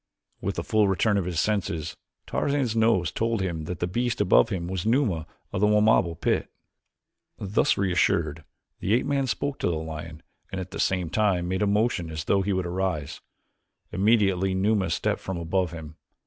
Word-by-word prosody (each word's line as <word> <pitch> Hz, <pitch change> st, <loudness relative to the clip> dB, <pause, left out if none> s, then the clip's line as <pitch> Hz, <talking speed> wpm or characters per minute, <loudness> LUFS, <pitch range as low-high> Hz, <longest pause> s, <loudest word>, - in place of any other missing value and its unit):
With -, -, -2 dB
the -, -, -3 dB
full 110 Hz, -2 st, +2 dB
return 100 Hz, +2 st, +2 dB
of 95 Hz, -, 0 dB
his 90 Hz, -3 st, -2 dB
senses 85 Hz, -6 st, -1 dB, 0.3 s
Tarzan's 140 Hz, -5 st, 0 dB
nose 110 Hz, -7 st, +2 dB
told 115 Hz, 0 st, -1 dB
him 85 Hz, -5 st, -3 dB
that 90 Hz, +1 st, -4 dB
the -, -, +2 dB
beast 120 Hz, +6 st, -1 dB
above -, -, +4 dB
him 85 Hz, -2 st, -3 dB
was 95 Hz, -1 st, -3 dB
Numa 110 Hz, -, +1 dB, 0.3 s
of -, -, -1 dB
the 105 Hz, -, +5 dB
Wamabo 105 Hz, -5 st, +3 dB
pit. -, -, 0 dB, 0.9 s
Thus 100 Hz, +1 st, +1 dB
reassured, 85 Hz, -4 st, +1 dB, 0.4 s
the 105 Hz, -, +2 dB
ape 125 Hz, -, +1 dB
man 140 Hz, -2 st, 0 dB
spoke 140 Hz, +3 st, -2 dB
to -, -, 0 dB
the 85 Hz, -, 0 dB
lion 80 Hz, 0 st, -7 dB, 0.3 s
and 95 Hz, -, -3 dB
at 95 Hz, 0 st, -6 dB
the -, -, -6 dB
same 90 Hz, -3 st, 0 dB
time 95 Hz, -5 st, +1 dB
made 95 Hz, +2 st, -1 dB
a 105 Hz, -, +2 dB
motion 105 Hz, -4 st, +1 dB
as 80 Hz, -1 st, -4 dB
though 100 Hz, +4 st, +2 dB
he 100 Hz, +1 st, -1 dB
would 95 Hz, -2 st, 0 dB
arise. 85 Hz, -5 st, -2 dB, 0.7 s
Immediately 95 Hz, -2 st, +2 dB
Numa 100 Hz, -1 st, +1 dB
stepped -, -, -1 dB
from 95 Hz, -2 st, -4 dB
above 85 Hz, +1 st, -1 dB
him. 80 Hz, -2 st, -9 dB
95 Hz, 185 wpm, -26 LUFS, 85-105 Hz, 0.9 s, the